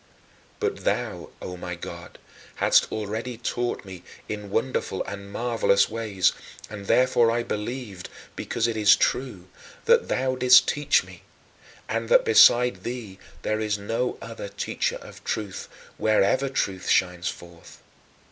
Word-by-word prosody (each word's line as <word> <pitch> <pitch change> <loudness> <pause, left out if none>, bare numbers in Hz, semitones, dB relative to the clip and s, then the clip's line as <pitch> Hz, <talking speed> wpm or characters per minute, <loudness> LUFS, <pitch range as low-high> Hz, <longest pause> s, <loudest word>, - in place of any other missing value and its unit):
But - - -2
thou, - - -2
O 90 - -6
my 90 0 -6
God, 85 0 -9 0.4
hadst - - +3
already 110 +3 -4
taught 120 -1 -3
me 95 -2 -9 0.3
in 105 -1 -6
wonderful 115 -3 -1
and 100 0 -8
marvelous 115 -4 +2
ways, 105 -5 +1 0.4
and 100 -2 -8
therefore 125 -2 +4
I 120 +1 0
believed 105 -4 -5 0.3
because 115 - -2
it 115 -1 -1
is 105 -2 +6
true 110 -9 -1 0.4
that - - +4
thou 130 0 0
didst 125 0 +7
teach 145 -1 +2
me - - -14 0.7
and - - -3
that - - +5
beside 125 - +6
thee 110 -4 -6 0.2
there 110 0 -1
is 105 -1 -1
no 115 +5 -2
other 115 -3 -7
teacher - - -2
of - - -12
truth, 100 -3 -4 0.3
wherever 110 +5 +2
truth 95 -8 -2
shines 90 -1 +1
forth. 85 -1 -12
110 Hz, 140 wpm, -25 LUFS, 100-125 Hz, 0.7 s, didst